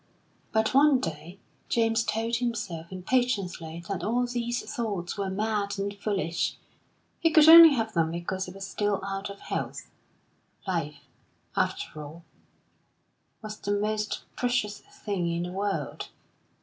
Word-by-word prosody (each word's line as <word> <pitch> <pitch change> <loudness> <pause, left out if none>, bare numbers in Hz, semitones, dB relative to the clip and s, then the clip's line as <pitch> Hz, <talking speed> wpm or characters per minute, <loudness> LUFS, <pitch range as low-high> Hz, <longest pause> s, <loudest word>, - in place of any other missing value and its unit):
But 220 +1 +1
one 280 0 +6
day 165 +2 -6 0.3
James 225 0 +2
told 230 +1 -1
himself 210 -9 -3
impatiently 185 -6 -1
that 190 -4 -3
all 240 +4 +1
these 240 0 -2
thoughts 205 -9 -3
were 200 -1 -2
mad 205 0 -1
and 200 +1 -3
foolish; 195 -5 -1 0.6
he 330 - +3
could 315 -2 +6
only 325 -2 +11
have 225 -2 -1
them 165 -2 +2
because 175 +3 -3
he - - -7
was 195 +1 -7
still 205 0 -1
out 195 0 -4
of 200 - -9
health. - - -5 0.7
Life, 160 -6 -2 0.5
after 155 - -1
all, 160 +4 -11 1.2
was 215 0 -6
the 205 - -1
most 210 0 -1
precious 245 -4 0
thing 190 -5 -4
in 170 +1 -1
the 180 - -5
world. 200 +1 -3
205 Hz, 135 wpm, -27 LUFS, 180-230 Hz, 1.2 s, only